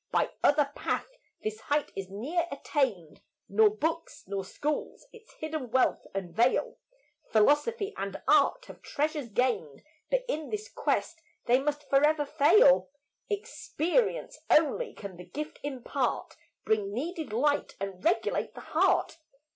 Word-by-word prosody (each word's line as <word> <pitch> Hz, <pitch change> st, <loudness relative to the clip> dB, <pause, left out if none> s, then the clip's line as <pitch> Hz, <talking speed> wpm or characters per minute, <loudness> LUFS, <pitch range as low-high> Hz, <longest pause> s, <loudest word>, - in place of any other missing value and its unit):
By -, -, +1 dB
other 285 Hz, -1 st, +4 dB
path -, -, -1 dB, 0.4 s
this 215 Hz, 0 st, -3 dB
height 290 Hz, +5 st, -1 dB
is 190 Hz, -1 st, -5 dB
ne'er 295 Hz, -, -2 dB
attained, 250 Hz, -, -2 dB, 0.3 s
Nor 215 Hz, +2 st, +5 dB
books 320 Hz, +10 st, -3 dB
nor 195 Hz, 0 st, -3 dB
schools 295 Hz, -, -3 dB
its 455 Hz, 0 st, -16 dB
hidden 310 Hz, -5 st, -5 dB
wealth 255 Hz, +2 st, +2 dB
unveil. 195 Hz, +6 st, +1 dB, 0.5 s
Philosophy 345 Hz, -, +2 dB
and -, -, -4 dB
art -, -, +4 dB
have -, -, -12 dB
treasures 295 Hz, -3 st, -2 dB
gained, 210 Hz, -, -1 dB, 0.3 s
But -, -, +1 dB
in 315 Hz, -10 st, -3 dB
this 425 Hz, +1 st, -4 dB
quest -, -, -1 dB, 0.2 s
they 245 Hz, +2 st, +4 dB
must 295 Hz, +1 st, -2 dB
forever 295 Hz, +2 st, +3 dB
fail 355 Hz, -, +5 dB, 0.4 s
Experience 415 Hz, +2 st, -1 dB
only 330 Hz, +11 st, +3 dB
can 195 Hz, -4 st, -8 dB
the 180 Hz, -, -10 dB
gift 300 Hz, -, -6 dB
impart, 265 Hz, -4 st, -2 dB, 0.3 s
Bring 210 Hz, -2 st, +1 dB
needed 315 Hz, -, -4 dB
light 285 Hz, +6 st, +1 dB
and 195 Hz, -2 st, -5 dB
regulate 345 Hz, +5 st, 0 dB
the -, -, -8 dB
heart. 325 Hz, -, +1 dB
290 Hz, 130 wpm, -29 LUFS, 215-325 Hz, 0.5 s, Nor